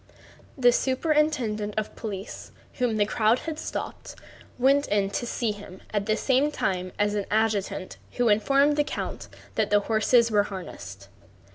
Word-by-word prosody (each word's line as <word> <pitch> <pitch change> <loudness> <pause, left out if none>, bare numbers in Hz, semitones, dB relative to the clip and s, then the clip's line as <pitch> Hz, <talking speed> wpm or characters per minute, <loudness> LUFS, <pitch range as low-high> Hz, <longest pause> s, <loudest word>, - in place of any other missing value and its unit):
The 245 -2 +5
superintendent 260 -7 0
of 215 - -3
police, 200 -2 -7 0.3
whom 240 -3 +1
the 205 - +3
crowd 220 +2 +2
had 315 +3 -5
stopped, - - -6 0.4
went 275 +3 +3
in 200 -1 +1
to 240 - -3
see 235 -2 -1
him 205 -2 -10
at 205 0 -1
the 215 0 +2
same 270 +4 +2
time 185 -9 -2
as 205 0 +1
an 205 -2 -2
adjutant 210 -3 -1 0.2
who 245 -1 +1
informed 275 +8 +3
the 295 - +4
count - - -5 0.3
that 220 -2 0
the 205 0 +4
horses 230 +2 +3
were 210 -1 +4
harnessed. 100 - -8
215 Hz, 155 wpm, -26 LUFS, 205-255 Hz, 0.4 s, The